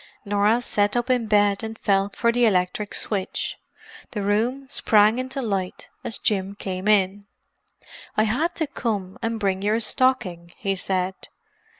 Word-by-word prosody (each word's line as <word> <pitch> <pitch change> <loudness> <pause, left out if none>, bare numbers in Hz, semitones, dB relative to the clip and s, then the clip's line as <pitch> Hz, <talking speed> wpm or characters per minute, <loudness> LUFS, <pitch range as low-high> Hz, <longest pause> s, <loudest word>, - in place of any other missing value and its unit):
Norah 205 +4 +2
sat 205 0 +1
up 240 +2 0
in 245 -3 +1
bed 205 -1 +3
and 220 0 -5
felt 200 -1 +1
for 235 - +2
the 245 +1 +1
electric 195 0 0
switch. 195 -3 -2 0.6
The 205 -3 -2
room 230 +7 0
sprang 215 -1 +4
into 260 +1 -3
light 195 -4 -3
as 225 - -2
Jim 195 -1 -1
came 190 -1 -4
in. 200 -1 +2 0.9
"I 215 - +5
had 290 +11 0
to 320 - 0
come 210 -9 -3
and 225 0 -2
bring 195 -2 0
your 210 +3 +1
stocking," 210 -8 +1
he 195 -2 -1
said. 185 0 -1
210 Hz, 155 wpm, -24 LUFS, 195-230 Hz, 0.9 s, I